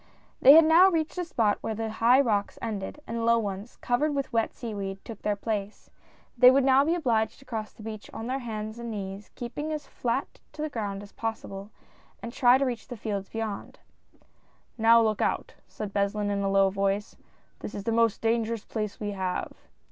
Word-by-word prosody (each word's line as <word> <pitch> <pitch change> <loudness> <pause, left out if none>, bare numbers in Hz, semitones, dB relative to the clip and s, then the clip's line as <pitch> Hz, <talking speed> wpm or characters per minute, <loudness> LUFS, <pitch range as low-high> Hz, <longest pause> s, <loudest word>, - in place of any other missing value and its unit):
They 275 - +10
had 325 +1 +8
now 340 +4 +7
reached 325 0 -1
a - - 0
spot 225 -11 +1
where 220 - -3
the 225 0 -3
high 235 +4 +4
rocks 210 -7 +1
ended, 215 +3 -5
and 230 0 -3
low 235 0 +4
ones, 205 0 -4
covered 290 +5 +1
with 275 -3 -3
wet 225 -1 +1
seaweed, 200 -4 -6
took 225 -3 -9
their 210 -1 0
place. 205 -1 -4 0.4
They 250 +1 +8
would 270 +1 +4
now 265 +1 +5
be 325 +4 +1
obliged 225 -9 0
to 270 - -18
cross 220 -4 -5
the 215 - -14
beach 215 -1 -7
on 225 - -6
their 260 +3 -2
hands 220 -2 -5
and 235 0 -5
knees, 200 -1 -6
keeping 290 +6 -5
as 300 -1 -4
flat 245 +2 -3
to 300 0 -5
the 310 - -2
ground 205 -4 -4
as 205 - -13
possible, 205 -3 -5 0.5
and 235 - -7
try 245 -1 +5
and 270 +1 +2
reach 240 -3 -4
the 245 - -7
fields 200 -2 -4
beyond. 220 -3 -5 1.0
"Now 230 0 +6
look 215 -2 0
out - - -1
I - - -31
" - - -39
said 205 -2 -7
Beslin, 205 +1 0
in 200 0 -1
a 195 - 0
low 195 0 +4
voice, 195 +1 -1 0.4
"this - - -7
is 200 - -5
the 230 - -1
most 230 -1 +2
dangerous 230 -1 0
place 215 -2 -4
we 205 -1 -3
have." 185 -2 -3
225 Hz, 210 wpm, -27 LUFS, 205-245 Hz, 1.0 s, They